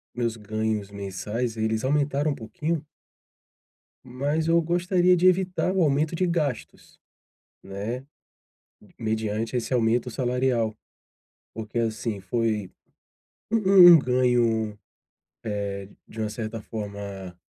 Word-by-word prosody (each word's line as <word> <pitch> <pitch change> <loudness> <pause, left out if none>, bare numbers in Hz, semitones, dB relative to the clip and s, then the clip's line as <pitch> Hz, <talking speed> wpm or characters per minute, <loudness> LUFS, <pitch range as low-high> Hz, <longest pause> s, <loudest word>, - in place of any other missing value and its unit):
meus 115 -2 -1
ganhos 110 -1 -3
mensais, 105 +4 -4
eles 110 +1 -1
aumentaram 145 +1 +1
um - - -3
pouquinho 150 +8 -3 1.2
mas 145 +6 -2
eu 170 0 +4
gostaria 180 +2 +2
de 180 +1 +4
evitar 185 0 +1
o 190 -3 +3
aumento 150 +3 +1
de 185 - +1
gastos, 150 -8 -3 0.6
né. 105 +7 -5 0.9
Mediante 110 +1 -2
esse 120 +2 -3
aumento 120 +1 +1
salarial. 125 -3 0 0.8
Porque, 110 +1 -5
assim. 110 -2 -2
foi, 105 0 -1 0.8
um 190 -5 +8
um - - +8
ganho, 120 -5 +1 0.7
eh, 100 -2 -4 0.2
de 110 - -11
uma 110 -1 -1
certa 110 0 -5
forma, 100 -4 -7
115 Hz, 110 wpm, -25 LUFS, 110-150 Hz, 1.2 s, um